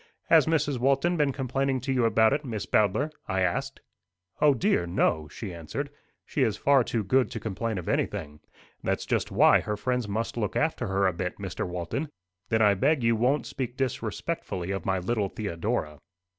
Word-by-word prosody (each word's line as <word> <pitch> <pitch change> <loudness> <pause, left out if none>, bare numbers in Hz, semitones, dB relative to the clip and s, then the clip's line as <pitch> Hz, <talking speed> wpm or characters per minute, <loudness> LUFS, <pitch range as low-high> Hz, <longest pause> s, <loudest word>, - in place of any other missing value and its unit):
"Has - - +6
Mrs. 150 -5 +1
Walton 140 +7 +2
been 150 -4 +2
complaining 135 0 -1
to 135 +2 -1
you 125 -2 +2
about 110 +2 +4
it, 145 +1 -1
Miss 115 -6 -4
Bowdler?" 110 +9 +2 0.2
I 95 - 0
asked. 135 +10 -1 0.6
"O 145 -2 +5
dear, 90 -6 +1
no!" 80 -3 +1
she 95 +4 -7
answered. 85 - -5 0.3
"She - - -2
is 105 -2 +2
far 140 -2 +4
too 115 -1 -2
good 130 +6 +2
to - - -5
complain 110 +1 -3
of 90 - -6
anything. 75 +1 -2 0.4
That's - - -1
just - - 0
why - - +6
her 105 0 -3
friends 125 +1 -1
must 110 +4 -3
look 105 -3 -2
after 155 -7 0
her 100 0 +1
a 95 - +2
bit, 90 +1 -4
Mr. 95 -2 -4
Walton." 90 - -3 0.4
"Then 110 0 +3
I 105 -1 +6
beg 135 +7 +2
you 115 0 +3
won't 125 +6 +1
speak 125 -2 -5
disrespectfully 95 -7 -3
of 95 -3 -3
my 95 0 +2
little 100 +2 -1
Theodora." 90 -5 -3
115 Hz, 185 wpm, -27 LUFS, 95-135 Hz, 0.6 s, Has